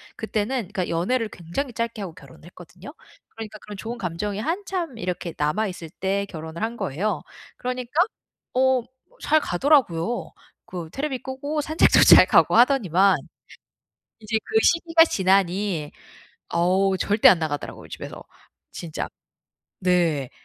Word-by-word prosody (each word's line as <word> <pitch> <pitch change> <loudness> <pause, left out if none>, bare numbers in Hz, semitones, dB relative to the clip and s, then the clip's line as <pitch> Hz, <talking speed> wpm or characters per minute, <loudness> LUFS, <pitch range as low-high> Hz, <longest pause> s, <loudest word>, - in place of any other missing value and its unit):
그때는 220 +3 -2
그러니까 185 -3 -2
연애를 215 +8 0
굉장히 210 - -5
짧게 230 -1 -3
하고 185 -5 -6
결혼을 140 0 -16
했거든요. 180 - -13 0.4
그러니까 220 -1 -9
그런 210 0 -10
좋은 230 +5 -6
감정이 195 +3 -3
한참 340 - -3
이렇게 180 -3 -4
남아있을 175 +2 -2
때 195 +1 0
결혼을 160 -2 -8
한 230 +1 -3
거예요. 190 +8 -2 0.4
그러니까 250 -1 -4 0.6
어 260 0 +3
뭐 235 - -20 0.3
잘 310 - +3
가더라고요. 240 - +1 0.3
그 175 -3 -7
테레비 275 -2 -3
끄고 285 +3 -3
산책도 315 +2 +4
잘 - - +9
가고 - - +4
하더니만 200 - +4 1.0
이제 220 0 -1
그 435 - -7
시기가 335 -1 +5
지나니 190 - +1 0.6
어우 185 +3 +2
절대 205 +3 +4
안 185 - +5
나가더라고요 155 -3 -5
집에서 - - -8 0.5
진짜. 165 -3 -5 0.7
네. 170 -7 +1
205 Hz, 310 characters per minute, -24 LUFS, 175-255 Hz, 1.0 s, 잘